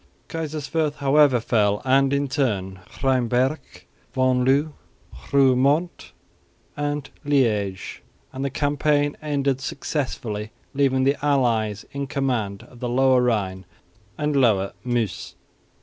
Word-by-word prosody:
Kaiserswerth, 155 -1 -2
however, 140 -2 +4
fell, 105 -3 +1
and 135 +1 +3
in 140 0 +1
turn 100 -9 -1 0.2
Rheinberg, 130 +2 +2 0.6
Venloo, 130 +3 +2 0.6
Roeremonde 140 +5 +2 0.6
and 145 -1 -2 0.2
Liège; 110 -10 0 0.3
and 135 +1 -4
the 140 - 0
campaign 145 +1 +1
ended 140 -3 -1
successfully, 120 -7 -3 0.2
leaving 135 -2 +2
the 140 +1 +1
allies 115 -7 +1
in 140 0 -4
command 125 -8 -2
of 120 - -16
the 125 -1 -3
lower 130 +1 +4
Rhine 100 -6 0 0.5
and 150 -1 -1
lower 105 -8 +2
Meuse. 120 -4 -2
135 Hz, 105 wpm, -23 LUFS, 120-145 Hz, 0.6 s, however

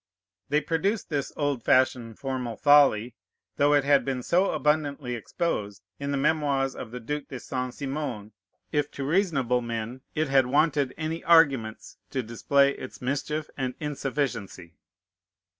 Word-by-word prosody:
They 150 +2 +2
produced 185 +8 -1
this 145 -4 -2
old 145 -4 0
fashioned 125 -3 +2
formal 130 -4 -3
folly, 140 -6 +5 0.4
though 145 +1 +4
it 145 - +3
had 140 0 +4
been 130 -2 -3
so 185 +8 +2
abundantly 150 -4 0
exposed 105 - -3 0.2
in 140 0 -3
the 140 - 0
Memoirs 140 -2 +1
of 115 - -7
the 125 +2 -7
Duke 145 +4 -4
de 130 - -7
Saint 130 0 -4
Simon, 135 -7 -4 0.4
if 145 -1 0
to 140 - -5
reasonable 140 - +1
men 115 +2 -5
it 155 0 +1
had 135 -2 +3
wanted 145 -1 +2
any 160 +1 -3
arguments 135 -10 +3
to 130 -2 -2
display 140 +5 +2
its 130 - -9
mischief 145 +4 -2
and 130 -2 -3
insufficiency. 135 - -3
140 Hz, 145 wpm, -27 LUFS, 125-150 Hz, 0.4 s, folly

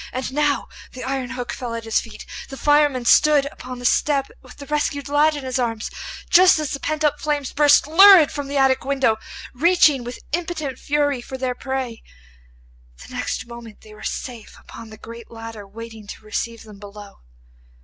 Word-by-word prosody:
And 255 +1 -4
now 295 0 +1 0.3
the 255 - -8
iron 260 -1 -3
hook 250 -1 -5
fell 240 -2 -5
at 230 - -5
his 225 -1 +1
feet, 215 -2 -11
and - - -10
the 270 - -8
fireman 290 -4 +2
stood 295 +2 +5
upon 255 0 -9
the 245 - -8
step 275 +1 +1
with 260 - -15
the 280 - -9
rescued 290 -1 -2
lad 300 +2 +3
in 290 - -6
his 260 0 -2
arms, 225 -3 -2 0.4
just 365 0 +6
as 305 -2 -3
the 275 - -3
pent 310 +2 -2
up 300 - +1
flames 290 -3 -2
burst 290 -1 +5
lurid 355 +1 +8
from 285 -2 -5
the 280 +1 -3
attic 265 -1 +3
window, 270 -5 +1 0.4
reaching 300 -2 +4
with 245 +1 -7
impotent 315 -5 -3
fury 285 -3 0
for 265 +2 -8
their 255 -1 -2
prey. 260 -3 -4 1.1
The - - -13
next - - -3
moment 235 -2 -11
they 215 - -15
were 210 - -14
safe 240 -4 -6
upon 225 -1 -12
the 215 - -12
great 230 +1 -11
ladder 225 -3 -9
waiting 225 0 -10
to 215 - -10
receive 230 +2 -4
them 210 -3 -14
below. 205 0 -12
260 Hz, 190 wpm, -21 LUFS, 230-290 Hz, 1.1 s, lurid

